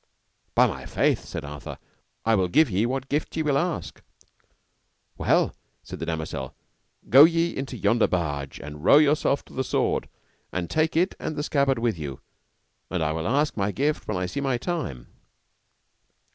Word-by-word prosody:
By - - +6
my - - -4
faith, - - +1
said - - -6
Arthur, 70 0 -8 0.5
I 115 - +3
will 95 -4 +3
give 140 - +3
you 105 +6 +1
what 135 0 -3
gift 150 +3 -2
ye 160 - +1
will 145 -2 +1
ask. 175 -2 -3 1.1
Well! - - +2 0.3
said - - -8
the 80 - -4
damosel, 80 -5 -4 0.5
go 135 +7 +9
ye 165 +1 +3
into 135 -2 -5
yonder 110 +2 +3
barge, 70 -6 -2
and 75 +1 -9
row 140 - +7
yourself 150 -1 +3
to - - -17
the 130 - -1
sword, - - 0 0.4
and 90 -2 -3
take 155 0 +1
it 180 +3 +2
and 155 - -4
the 145 - -2
scabbard 140 -3 +2
with 115 -6 -1
you, 70 -3 -6 0.7
and 90 -3 -1
I 75 - 0
will 80 +1 -2
ask 145 +6 +1
my 100 -1 0
gift 145 +7 -1
when - - -1
I 90 - -1
see 140 +10 -4
my 135 -3 0
time. 120 - -4
120 Hz, 175 wpm, -25 LUFS, -, 1.1 s, go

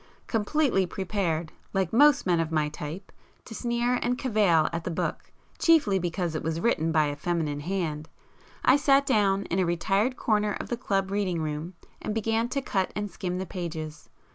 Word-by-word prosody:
Completely 225 -3 +1
prepared, 175 -4 -2 0.2
like 190 -1 0
most 290 +3 +5
men 175 -2 +2
of 165 -1 -1
my 155 -2 +1
type 155 +6 -7 0.3
to - - -9
sneer 240 +2 0
and 245 +1 0
cavil 205 - +3
at 165 0 -2
the - - -3
book, 165 - -3 0.3
chiefly 290 - +4
because 175 -1 -2
it 155 - -2
was 160 0 -2
written 165 -6 +1
by 155 -1 +3
a 145 0 -2
feminine 155 -2 -2
hand, 155 -2 -3 0.6
I - - +6
sat 280 -1 +4
down 200 -6 +2
in 185 -1 -2
a - - +3
retired 195 +8 +1
corner 210 -2 +1
of - - -6
the 240 - 0
club 195 -5 -1
reading 195 -4 0
room, 155 +4 -4 0.3
and 215 - -3
began 225 +1 0
to 275 +1 -2
cut 190 -6 0
and 205 -1 -3
skim 180 0 -3
the 190 - -3
pages. 160 -4 -6
190 Hz, 185 wpm, -27 LUFS, 165-225 Hz, 0.6 s, I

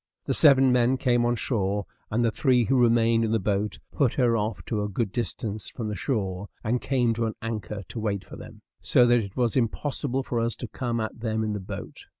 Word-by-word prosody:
The - - 0
seven 135 -3 +6
men 125 +1 +3
came 120 -2 +2
on 120 - +1
shore, 100 -4 -1 0.2
and 120 +2 +1
the 115 - +2
three 125 0 +3
who 130 0 +3
remained 115 -1 +3
in 110 - 0
the 115 - +3
boat 100 0 -1
put 135 -6 +1
her 120 -3 +3
off 110 0 -2
to 110 -3 -2
a 105 - -2
good 100 0 -2
distance 110 -2 -3
from 110 -3 -5
the 105 - -3
shore, 100 -3 -2 0.2
and 120 +2 0
came 125 -4 +1
to 115 0 -1
an 110 - -4
anchor 110 -2 -5
to 115 - -5
wait 100 -3 -2
for - - -10
them; - - -12 0.2
so 125 - +4
that 120 0 +4
it 100 -1 -6
was 120 -2 +1
impossible 135 +2 -1
for 120 -2 -2
us 115 0 0
to 120 - -6
come 120 0 -3
at 110 +1 -4
them 110 -1 -1
in 110 -1 -1
the 105 - -3
boat. 95 - -8
115 Hz, 230 wpm, -26 LUFS, 105-125 Hz, 0.2 s, seven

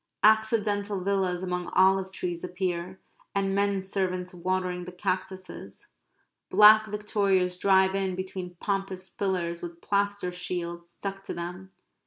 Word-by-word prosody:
Accidental 210 -2 +3
villas 185 -2 0
among 180 -1 -2
olive 190 0 +4
trees 175 -3 -4
appear; 180 0 -3 0.4
and 195 -1 +1
men 200 -1 +1
servants 185 -2 -2
watering 180 0 -2
the 180 - -7
cactuses. 185 0 -5 0.6
Black 215 +1 +8
victorias 200 -3 +1
drive 190 0 +4
in 190 -1 -1
between 185 -1 -5
pompous 190 -1 -3
pillars 175 -4 -2
with 170 -1 -7
plaster 200 -2 0
shields 170 -1 -5
stuck 195 +2 -6
to - - -5
them. 180 +2 -6
190 Hz, 125 wpm, -28 LUFS, 180-200 Hz, 0.6 s, Black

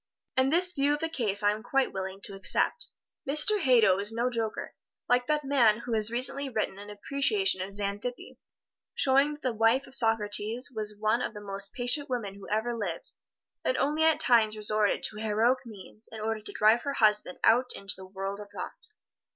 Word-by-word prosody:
And 260 +1 +2
this 360 +2 +3
view 285 0 +1
of - - -8
the 325 +1 -3
case 215 -10 -2
I 205 - +4
am 210 +1 -5
quite 265 +3 -1
willing 190 0 -6
to 200 - -1
accept. 195 - 0 0.4
Mr. 305 +9 +4
Hadow 230 - +4
is 205 +2 0
no 240 +2 -1
joker, 225 -2 -4 0.3
like 245 0 +1
that 300 -1 0
man 240 -6 +3
who 235 -1 -5
has 215 -1 +3
recently 260 +4 +2
written 215 -4 -3
an 205 0 -9
appreciation 280 - 0
of 190 - -4
Xantippe, 205 +4 -4 0.6
showing 275 +2 +3
that 295 - -13
the 255 - -1
wife 225 +5 +2
of 260 - -14
Socrates 225 +1 +2
was 210 -2 -3
one 215 +3 +1
of 225 - -4
the - - -7
most 200 -1 -2
patient 250 +3 -2
women 230 -6 -3
who 200 0 -12
ever 220 +3 -1
lived, 195 -7 -5 0.5
and - - 0
only 300 +2 0
at 320 -1 +3
times 220 -3 +3
resorted 210 0 +1
to 210 - 0
heroic 230 +4 0
means 215 +1 -13
in 225 - -8
order 220 0 -2
to 210 - -7
drive 215 +3 +3
her 280 - -3
husband 210 -6 +2
out 245 +2 +3
into 200 +1 -1
the 190 0 -12
world 195 +1 -6
of 205 - -9
thought. - - -6
225 Hz, 200 wpm, -28 LUFS, 210-260 Hz, 0.6 s, I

